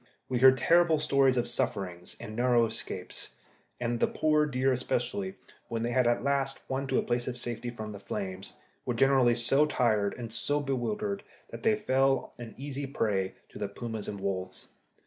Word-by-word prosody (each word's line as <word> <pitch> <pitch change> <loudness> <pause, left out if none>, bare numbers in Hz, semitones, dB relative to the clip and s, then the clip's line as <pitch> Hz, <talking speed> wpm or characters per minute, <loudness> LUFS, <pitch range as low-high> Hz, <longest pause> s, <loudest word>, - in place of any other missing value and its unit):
We 125 -2 0
heard 130 +1 +8
terrible 165 +3 +4
stories 140 -3 +3
of 120 0 +1
sufferings 90 -6 -3
and 110 -2 -7
narrow 120 -1 +4
escapes, 110 - -5 0.4
and 120 -1 -1
the - - +3
poor 150 -1 +2
deer 135 -1 +1
especially, 130 +10 -1 0.3
when 115 -1 -2
they 120 - -1
had 125 0 +3
at 120 - +2
last 140 -1 0
won 135 +1 -2
to 130 - +1
a - - +2
place 120 0 -1
of 125 -1 -3
safety 120 0 -4
from 110 -3 -6
the 100 - -8
flames, 95 -1 -5 0.3
were 125 - -2
generally 130 -1 +4
so 135 +5 +3
tired 110 -8 +1
and 115 -2 -6
so 145 +5 0
bewildered 200 - -2 0.3
that - - -7
they 220 -1 +3
fell 135 -8 +1
an 115 -2 -8
easy 140 +1 -4
prey 100 -8 -1
to - - -11
the 100 - -1
pumas 110 +1 -5
and 100 - -5
wolves. 95 -1 -4
125 Hz, 185 wpm, -29 LUFS, 115-135 Hz, 0.4 s, heard